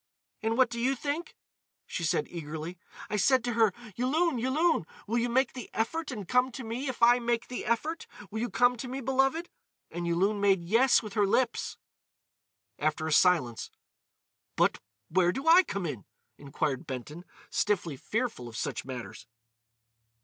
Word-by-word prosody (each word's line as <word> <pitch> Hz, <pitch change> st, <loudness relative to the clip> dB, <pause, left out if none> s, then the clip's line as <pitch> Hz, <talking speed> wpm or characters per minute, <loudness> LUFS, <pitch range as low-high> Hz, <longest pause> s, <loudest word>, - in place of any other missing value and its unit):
"And 225 Hz, +1 st, 0 dB
what 255 Hz, -3 st, +4 dB
do 235 Hz, -, -4 dB
you 260 Hz, +3 st, +2 dB
think!" 290 Hz, +6 st, -4 dB, 0.5 s
she 170 Hz, -, -4 dB
said 155 Hz, -, +1 dB
eagerly. 160 Hz, +1 st, -6 dB, 0.3 s
"I 210 Hz, -, -2 dB
said 255 Hz, +4 st, +4 dB
to 240 Hz, 0 st, -1 dB
her, 225 Hz, -2 st, +4 dB, 0.2 s
'Yulun! 285 Hz, +3 st, +1 dB
Yulun! 270 Hz, -, +1 dB, 0.2 s
Will 230 Hz, +3 st, 0 dB
you 240 Hz, +1 st, 0 dB
make 260 Hz, +3 st, +2 dB
the 250 Hz, -3 st, -8 dB
effort 310 Hz, +8 st, -1 dB
and 210 Hz, -8 st, -6 dB
come 250 Hz, +4 st, +3 dB
to 260 Hz, -, -6 dB
me 235 Hz, +5 st, -4 dB
if 250 Hz, -2 st, -3 dB
I 240 Hz, +1 st, +7 dB
make 235 Hz, -1 st, -1 dB
the 250 Hz, -, -5 dB
effort? 305 Hz, +9 st, -1 dB, 0.2 s
Will 220 Hz, -, -3 dB
you 240 Hz, +2 st, -1 dB
come 245 Hz, 0 st, +3 dB
to 250 Hz, -, -5 dB
me, 260 Hz, +2 st, -4 dB
beloved?' 270 Hz, +6 st, +1 dB, 0.4 s
And 175 Hz, 0 st, -4 dB
Yulun 195 Hz, +5 st, +1 dB
made 195 Hz, -3 st, +3 dB
'Yes,' 230 Hz, +9 st, +4 dB
with 210 Hz, -2 st, -7 dB
her 205 Hz, -3 st, +2 dB
lips." 240 Hz, +4 st, 0 dB, 1.0 s
After 155 Hz, +1 st, 0 dB
a 160 Hz, -, -2 dB
silence: 150 Hz, -, +3 dB, 0.9 s
"But—where 115 Hz, -, +1 dB
do 270 Hz, -, -5 dB
I 340 Hz, +3 st, +9 dB
come 200 Hz, -, -4 dB
in?" 130 Hz, -, -5 dB, 0.3 s
inquired 140 Hz, -1 st, -3 dB
Benton, 140 Hz, +6 st, -6 dB, 0.3 s
stiffly 175 Hz, -7 st, 0 dB
fearful 220 Hz, -, -3 dB
of 115 Hz, -2 st, -8 dB
such -, -, -3 dB
matters. 125 Hz, -3 st, -8 dB
225 Hz, 165 wpm, -29 LUFS, 170-255 Hz, 1.0 s, I